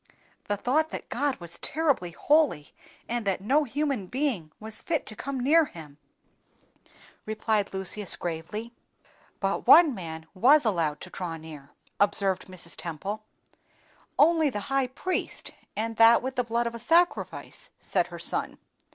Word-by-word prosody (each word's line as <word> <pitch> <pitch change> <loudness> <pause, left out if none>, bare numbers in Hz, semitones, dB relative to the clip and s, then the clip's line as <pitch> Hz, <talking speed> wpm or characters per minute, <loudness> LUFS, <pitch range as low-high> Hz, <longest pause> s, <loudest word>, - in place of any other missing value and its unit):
"The 205 - -1
thought 300 +9 +1
that - - -7
God 280 +1 0
was 170 -1 -9
terribly 285 - 0
holy, 285 - +2 0.3
and 240 0 -2
that 195 - +1
no 275 +10 +2
human 275 -6 -2
being 245 - -2
was 215 0 -5
fit 320 -4 -1
to 215 - -7
come 270 +4 -4
near 310 +6 +5
Him," 150 - -12 1.3
replied 215 -1 0
Lucius, 190 +1 -1
gravely. 175 +8 -5 0.7
"But - - -1
one 330 -5 +8
man 160 -5 -7
was 265 +9 +5
allowed 165 -8 0
to 185 - -10
draw 175 -3 -5
near," 155 -3 -11 0.3
observed 195 -2 +1
Mrs. 180 -2 -7
Temple. 195 +6 -5 0.9
"Only 320 0 +5
the 210 -6 -4
high 270 -1 +2
priest, 360 +8 -3 0.2
and 225 +1 -3
that 230 +1 +7
with 260 0 -3
the 250 - +1
blood 235 0 0
of 235 - -2
a 235 - -7
sacrifice," 335 +9 +1
said - - 0
her - - -9
son. - - -1
220 Hz, 150 wpm, -27 LUFS, 185-275 Hz, 1.3 s, one